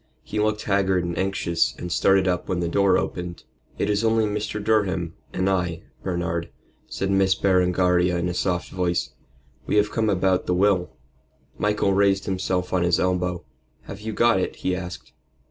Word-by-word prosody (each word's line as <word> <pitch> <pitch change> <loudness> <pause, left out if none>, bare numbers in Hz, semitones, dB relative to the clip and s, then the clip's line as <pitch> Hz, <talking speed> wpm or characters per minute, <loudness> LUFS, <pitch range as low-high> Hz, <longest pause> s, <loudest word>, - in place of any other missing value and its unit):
He 105 - -4
looked 105 0 0
haggard 95 -3 +1
and 85 0 -3
anxious, 85 -8 0
and 90 - -6
started 95 +1 +3
up 90 -1 -1
when 90 - 0
the 85 - -1
door 100 +3 +3
opened. 90 -1 -4 0.3
"It - - 0
is 105 +1 +1
only 110 -1 +3
Mr. 105 0 -3
Durham 95 -6 0 0.2
and 95 - -1
I, 90 -3 -1 0.2
Bernard," 85 -2 -2 0.4
said 95 0 -2
Miss 95 0 +3
Berengaria 90 -1 +2
in 85 0 -1
a 90 - -2
soft 90 0 -1
voice. 90 -2 -1 0.6
"We - - 0
have 105 0 +3
come 110 -1 0
about 95 -1 +1
the 90 - +1
will." 95 -2 +2 0.7
Michael 105 -1 +1
raised 100 0 +2
himself 95 -1 -2
on 90 - +2
his 85 -1 +2
elbow. 90 -1 -1 0.4
"Have 100 - -9
you 110 +1 -4
got 115 -2 +3
it?" - - -2
he 90 - -1
asked. 90 -1 -8
95 Hz, 175 wpm, -24 LUFS, 90-100 Hz, 0.7 s, started